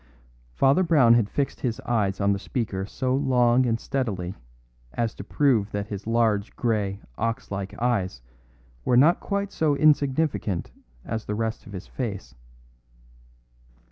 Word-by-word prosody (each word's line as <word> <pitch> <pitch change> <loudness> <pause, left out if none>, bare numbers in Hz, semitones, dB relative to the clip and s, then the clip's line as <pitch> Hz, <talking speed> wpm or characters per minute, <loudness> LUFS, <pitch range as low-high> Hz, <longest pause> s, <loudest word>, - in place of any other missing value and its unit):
Father 135 - +4
Brown 150 -10 +5
had 115 -3 +3
fixed 140 -1 -2
his 120 -4 -2
eyes 105 -5 0
on 100 0 +3
the 100 - -3
speaker 100 -5 -3
so 130 +4 -2
long 125 -2 +3
and 115 -1 0
steadily 105 -11 -2 0.6
as 115 -2 -1
to - - -8
prove 115 -3 +2
that 100 0 -4
his 100 0 -6
large 115 -3 +1
grey, 105 -5 -1 0.2
ox 115 -1 -2
like 100 0 -5
eyes 100 - -1 0.6
were 120 - +3
not 155 +7 +5
quite 200 0 -2
so 150 -3 +1
insignificant 140 - +1 0.3
as 110 -1 -4
the 105 - -3
rest 110 +1 -3
of 100 - -11
his 95 0 -7
face. 105 -7 -5
115 Hz, 145 wpm, -25 LUFS, 100-130 Hz, 0.6 s, Brown